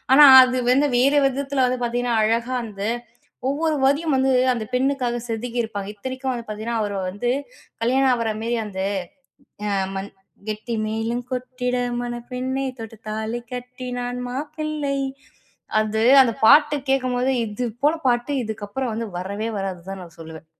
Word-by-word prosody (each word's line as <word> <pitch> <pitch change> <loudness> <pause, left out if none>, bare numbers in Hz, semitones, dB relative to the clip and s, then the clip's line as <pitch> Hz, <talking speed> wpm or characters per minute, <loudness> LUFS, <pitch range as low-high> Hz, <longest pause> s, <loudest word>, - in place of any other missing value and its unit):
ஆனா, 295 +2 +9 0.2
அது 255 0 +2
வந்து 280 +3 +4
வேறு 275 +4 +4
விதத்தில 270 0 0
வந்து 250 0 -1
பார்த்தீங்கன்னா, 240 0 0
அழகா 230 +3 +1
வந்து 205 -1 -4 0.6
ஒவ்வொரு 310 +2 0
வரியும் 285 +2 +2
வந்து 265 0 +3 0.2
அந்த 225 -3 -3
பெண்ணுக்காக 255 -2 +1
செதுக்கிருப்பாங்க. 225 -3 -3
இத்தனைக்கும் 260 +4 -3
வந்து 235 -1 -6
பார்த்தீங்கன்னா, 220 +2 -3
அவர 205 -1 -3 0.2
வந்து 225 +6 -2 0.5
கல்யாணம் 260 +3 +3
ஆகிறமாரி 230 0 -1
அந்த 190 -2 -6 1.2
மண் 195 +1 -5 0.4
கெட்டி 215 +2 -3
மேளம் 225 +2 -2
கொட்டிட 250 0 -2 0.2
மணப் 240 0 -5
பெண்ணே! 260 +2 -2
தொட்டு 225 -1 -9
தாலி 220 +2 -3
கட்டினான் 250 0 -5
மாப்பிள்ளை 300 +1 -3 0.8
அது 215 0 0 0.2
அந்த 240 -3 +2
பாட்டு 295 +3 +7
கேட்கும்போது 255 -1 +1
இது 210 +4 -3 0.2
போல 300 +3 +4
பாட்டு 245 +3 +1
இதுக்கப்பறம் 220 +3 -4
வந்து 230 +1 -3
வரவே 200 +4 -3
வராதுன்னு 190 -2 -5
தான் 195 -1 -6
நான் 170 -1 -15
சொல்லுவேன். 160 0 -10
245 Hz, 135 wpm, -23 LUFS, 220-265 Hz, 1.2 s, ஆனா